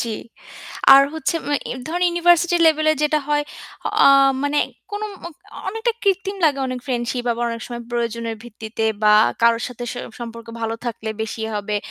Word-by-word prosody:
জ্বি। 225 -2 -3 0.8
আর 275 - +8
হচ্ছে 320 +1 -1
আ - - +1 0.4
ধরেন 350 +2 0
ইউনিভার্সিটি 345 0 +3
লেভেলে 310 0 +4
যেটা 300 0 +2
হয়, 295 0 +1 0.6
আ - - +8 0.4
মানে 285 +1 +1 0.3
কোন 410 +1 -4 0.2
মা - - -4 0.4
অনেকটা 450 +3 -1
কৃত্রিম 390 0 0
লাগে 290 -3 +3
অনেক 255 -1 -4
ফ্রেন্ডশিপ 245 -1 -2
আবার 235 +1 -2
অনেক 230 -1 -5
সময় 240 -1 -6
প্রয়োজনের 235 -1 -2
ভিত্তিতে 225 -1 -5 0.2
বা 210 0 +6 0.3
কারো 230 0 +5
সাথে 245 -1 -7
স - - -7 0.3
সম্পর্ক 230 -1 -8
ভালো 225 0 -2
থাকলে 220 -1 -4
বেশি 220 0 -5
হবে। 210 0 -2
245 Hz, 160 wpm, -21 LUFS, 230-320 Hz, 0.8 s, আর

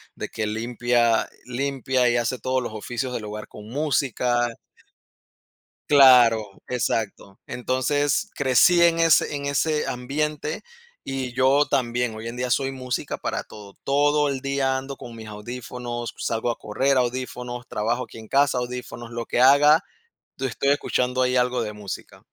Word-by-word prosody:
de - - -5
que 110 - -4
limpia 120 +1 +1 0.2
limpia, 130 -1 0
y 120 - +2
hace 120 +2 -1
todos 130 +1 -1
los 120 -3 -5
oficios 120 +4 -4
del 115 - -4
hogar, 105 0 -7
con 105 0 -12
música. 125 -4 0 1.4
Claro, 120 -7 +6
exacto. 110 -5 -2
Entonces 145 - 0
crecí, 145 +6 +4
en 170 -1 +4
ese 165 -2 +4
en 140 0 -4
ese 150 +2 0
ambiente, 150 +4 -3 0.4
y 130 -2 -4
yo 135 +3 +4
también, 120 -2 0
hoy 110 +1 -7
en 120 - -8
día, 125 0 -2
soy 135 +2 +1
música 130 -2 -4
para - - -3
todo. 105 -2 -13
Todo 145 +1 +2
el 135 -1 -2
día 135 -1 0
ando, 135 +1 -6
con 120 -1 -10
mis 110 -1 -9
audífonos, 120 +2 -6
salgo 115 +1 -1
a - - -6
correr, 135 +6 0
audífonos, 125 -1 -3
trabajo 115 +4 -1
aquí 115 - -11
en 110 - -11
casa, 140 -2 +3
audífonos, 125 -1 -6
lo 115 0 -4
que 120 - 0
haga, 145 +6 +6 0.5
tu 135 - -5
estoy 140 +3 0
escuchando, 130 -2 +1
ahí 125 0 +1
algo 125 -1 +1
de 105 - -4
música. 105 -2 -8
125 Hz, 155 wpm, -24 LUFS, 120-135 Hz, 1.4 s, Claro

